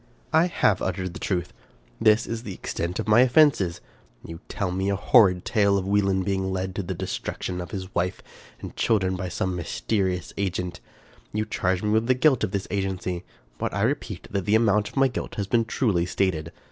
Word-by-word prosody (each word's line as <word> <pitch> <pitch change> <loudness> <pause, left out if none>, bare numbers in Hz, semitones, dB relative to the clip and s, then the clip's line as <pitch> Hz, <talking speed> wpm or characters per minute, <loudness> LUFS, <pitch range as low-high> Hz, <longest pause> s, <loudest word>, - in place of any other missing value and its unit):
" - - -31
I 160 +3 +5
HAVE 105 - +2
Uttered 95 -1 -2
the - - -8
truth. 90 -3 -2 0.5
This 110 0 +4
is 115 0 -4
the 100 -6 -7
extent 85 +1 -4
of 110 - -3
my 110 +2 +6
offenses. 125 - +4 0.4
You 85 0 -8
tell 100 -4 -2
me 95 +2 -1
a 100 - +1
horrid 95 -4 +4
tale 100 -3 +3
of 95 - -2
Wieland 95 -1 +1
being 95 -1 -1
led 95 0 -2
to 100 - -2
the 95 0 -4
destruction 90 +1 -4
of 90 - -7
his 95 +2 -6
wife 90 +2 -1 0.4
and - - -8
children 95 -4 +1
by 90 -1 -4
some 90 +1 -2
mys 85 -2 -5
terious 95 -5 0
agent. 90 -2 -2 0.5
You 105 +1 0
charge 95 -3 -1
me 105 - +1
with 110 +1 +2
the 130 - +4
guilt 130 -1 +3
of - - +1
this 100 0 -3
agency; 95 -3 -2 0.4
but - - -2
I - - 0
repeat - - -2
that 100 -2 -2
the 105 - +3
amount 105 -2 +3
of - - -13
my 135 0 +5
guilt 125 - -5
has 100 - -2
been 115 +3 +2
truly 105 -7 0
stated. 85 -4 -1
95 Hz, 210 wpm, -25 LUFS, 90-110 Hz, 0.5 s, my